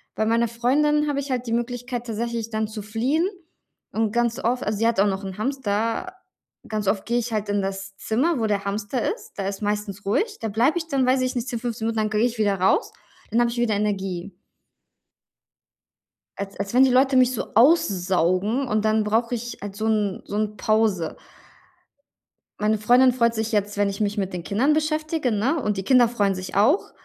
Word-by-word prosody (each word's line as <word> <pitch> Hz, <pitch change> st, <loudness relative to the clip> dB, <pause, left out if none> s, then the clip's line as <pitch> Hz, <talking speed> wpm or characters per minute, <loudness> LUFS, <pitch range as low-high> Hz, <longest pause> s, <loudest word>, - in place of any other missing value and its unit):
bei 220 Hz, -, 0 dB
meiner 230 Hz, +1 st, +2 dB
Freundin 295 Hz, +6 st, +1 dB
habe 285 Hz, -1 st, 0 dB
ich 280 Hz, -1 st, -4 dB
halt 250 Hz, -1 st, -2 dB
die 230 Hz, -, -1 dB
Möglichkeit 245 Hz, +1 st, -3 dB
tatsächlich 230 Hz, 0 st, -3 dB
dann 220 Hz, 0 st, -1 dB
zu 215 Hz, 0 st, -7 dB
fliehen 245 Hz, -, 0 dB, 0.6 s
und 220 Hz, -1 st, 0 dB
ganz 235 Hz, 0 st, 0 dB
oft 245 Hz, +2 st, 0 dB
also, 210 Hz, 0 st, -1 dB
sie 225 Hz, +2 st, +2 dB
hat 230 Hz, -4 st, +1 dB
auch 200 Hz, -, +5 dB
noch 195 Hz, 0 st, -2 dB
'n 190 Hz, -1 st, -6 dB
Hamster. 230 Hz, -, -2 dB, 0.5 s
Ganz 215 Hz, -2 st, -3 dB
oft 195 Hz, 0 st, 0 dB
gehe 240 Hz, +1 st, +1 dB
ich 235 Hz, -1 st, -4 dB
halt 215 Hz, -1 st, -2 dB
in 205 Hz, 0 st, +1 dB
das 195 Hz, 0 st, -5 dB
Zimmer, 270 Hz, +7 st, 0 dB
wo 225 Hz, -, 0 dB
der 205 Hz, -2 st, 0 dB
Hamster 205 Hz, +5 st, -2 dB
ist. 450 Hz, -1 st, -14 dB
Da 195 Hz, -1 st, -2 dB
ist 200 Hz, +1 st, -4 dB
meistens 205 Hz, -1 st, -3 dB
ruhig. 415 Hz, -, 0 dB
Da 225 Hz, -, -2 dB
bleibe 240 Hz, -, +2 dB
ich 325 Hz, -2 st, -3 dB
dann 275 Hz, -4 st, +1 dB
weiß 260 Hz, +1 st, +3 dB
ich 255 Hz, 0 st, -1 dB
nicht, 245 Hz, 0 st, -2 dB
10, 240 Hz, -3 st, -3 dB
15 230 Hz, -2 st, -4 dB
Minuten, 230 Hz, 0 st, -2 dB
dann 215 Hz, 0 st, 0 dB
gehe 215 Hz, +2 st, +2 dB
ich 240 Hz, -1 st, -2 dB
wieder 205 Hz, -2 st, +2 dB
raus, 190 Hz, -, +2 dB, 0.4 s
dann 230 Hz, -, +2 dB
habe 240 Hz, -, +2 dB
ich 235 Hz, -, -6 dB
wieder 235 Hz, -3 st, +1 dB
Energie. 195 Hz, -3 st, -2 dB, 2.0 s
Als 200 Hz, 0 st, -6 dB
als 200 Hz, +1 st, -3 dB
wenn 255 Hz, +2 st, +6 dB
die 265 Hz, -, +5 dB
Leute 260 Hz, +2 st, +3 dB
mich 255 Hz, -1 st, +5 dB
so 235 Hz, -, -5 dB
aussaugen 205 Hz, -, +2 dB
und 215 Hz, -2 st, 0 dB
dann 215 Hz, 0 st, +2 dB
brauche 230 Hz, +3 st, 0 dB
ich 240 Hz, 0 st, -6 dB
halt 200 Hz, -1 st, -7 dB
so 215 Hz, +2 st, -3 dB
'n 210 Hz, -3 st, 0 dB
so 205 Hz, -, -6 dB
'n 210 Hz, 0 st, -1 dB
Pause. 215 Hz, -6 st, +1 dB, 1.4 s
Meine 215 Hz, +1 st, +2 dB
Freundin 245 Hz, +4 st, +5 dB
freut 235 Hz, -2 st, +2 dB
sich 220 Hz, 0 st, -2 dB
jetzt, 205 Hz, -1 st, -1 dB
wenn 205 Hz, 0 st, +2 dB
ich 200 Hz, -, -6 dB
mich 210 Hz, 0 st, -1 dB
mit 195 Hz, -2 st, -1 dB
den 180 Hz, -2 st, -5 dB
Kindern 245 Hz, -, +2 dB
beschäftige, 310 Hz, -2 st, 0 dB
ne, 240 Hz, +10 st, +1 dB
und 210 Hz, -4 st, -1 dB
die 190 Hz, -, -2 dB
Kinder 250 Hz, +2 st, +5 dB
freuen 205 Hz, -4 st, 0 dB
sich 185 Hz, 0 st, -7 dB
auch. 255 Hz, -, +3 dB
220 Hz, 210 wpm, -23 LUFS, 205-245 Hz, 2.0 s, wenn